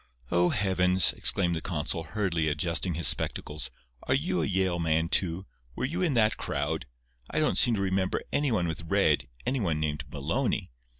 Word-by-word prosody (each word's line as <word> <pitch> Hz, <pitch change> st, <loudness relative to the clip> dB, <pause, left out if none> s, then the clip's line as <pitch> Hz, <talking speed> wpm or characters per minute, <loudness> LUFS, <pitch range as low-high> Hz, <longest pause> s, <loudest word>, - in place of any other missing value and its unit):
"Oh, 90 Hz, 0 st, +3 dB
heavens!" 95 Hz, -2 st, +4 dB
exclaimed 90 Hz, -3 st, +3 dB
the 80 Hz, -, -4 dB
consul, 85 Hz, -1 st, -2 dB
hurriedly 85 Hz, -3 st, -1 dB
adjusting 85 Hz, +3 st, 0 dB
his 85 Hz, -, +5 dB
spectacles. 75 Hz, -3 st, 0 dB, 0.3 s
"Are 130 Hz, -, 0 dB
you 165 Hz, +7 st, -1 dB
a -, -, -1 dB
Yale 95 Hz, -2 st, 0 dB
man, 80 Hz, 0 st, 0 dB
too? 90 Hz, +1 st, +1 dB, 0.3 s
Were -, -, -2 dB
you 170 Hz, +7 st, -3 dB
in 165 Hz, -7 st, +1 dB
that 110 Hz, -2 st, +2 dB
crowd? -, -, -3 dB, 0.4 s
I -, -, -1 dB
don't -, -, +1 dB
seem 120 Hz, -, +5 dB
to 100 Hz, -, -2 dB
remember 95 Hz, -1 st, -1 dB
any 145 Hz, -2 st, +1 dB
one 90 Hz, -6 st, 0 dB
with 80 Hz, 0 st, -6 dB
red—any 120 Hz, -, 0 dB
one 85 Hz, -8 st, -1 dB
named 75 Hz, -1 st, -3 dB
Maloney. 70 Hz, -3 st, -2 dB
90 Hz, 175 wpm, -27 LUFS, 80-105 Hz, 0.4 s, his